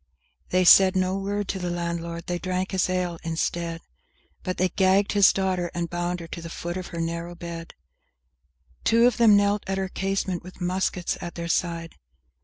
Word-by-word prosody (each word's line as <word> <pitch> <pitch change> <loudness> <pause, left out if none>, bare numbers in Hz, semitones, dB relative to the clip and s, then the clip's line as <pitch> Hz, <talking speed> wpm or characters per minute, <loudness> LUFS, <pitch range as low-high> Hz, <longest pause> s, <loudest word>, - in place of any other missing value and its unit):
II 65 -3 -44
They 185 0 +3
said 185 +2 +7
no 185 0 +1
word 200 +1 -2
to 190 - -2
the 180 -1 -2
landlord, 170 -1 -4
they 175 -1 -2
drank 185 +1 -2
his 190 -1 +1
ale 180 -2 -1
instead, 165 0 -2 0.6
But 185 - -3
they 185 0 +2
gagged 190 +2 +3
his 200 -2 +6
daughter 185 -2 -1
and 170 -1 -3
bound 175 0 -2
her 165 - -8
to 170 - -6
the 165 - -7
foot 175 +1 -5
of 185 -1 -5
her 170 - -6
narrow 170 +1 -3
bed; 170 -1 -8 1.1
Two 230 +1 +4
of 245 -2 +3
them 225 -4 +6
knelt 205 0 +2
at 195 0 -1
her 190 -1 -2
casement, 195 -2 -2
with 185 +1 -13
muskets 180 -1 -1
at 175 -1 -6
their 170 0 -4
side! 165 -1 -1
180 Hz, 195 wpm, -25 LUFS, 170-190 Hz, 1.1 s, said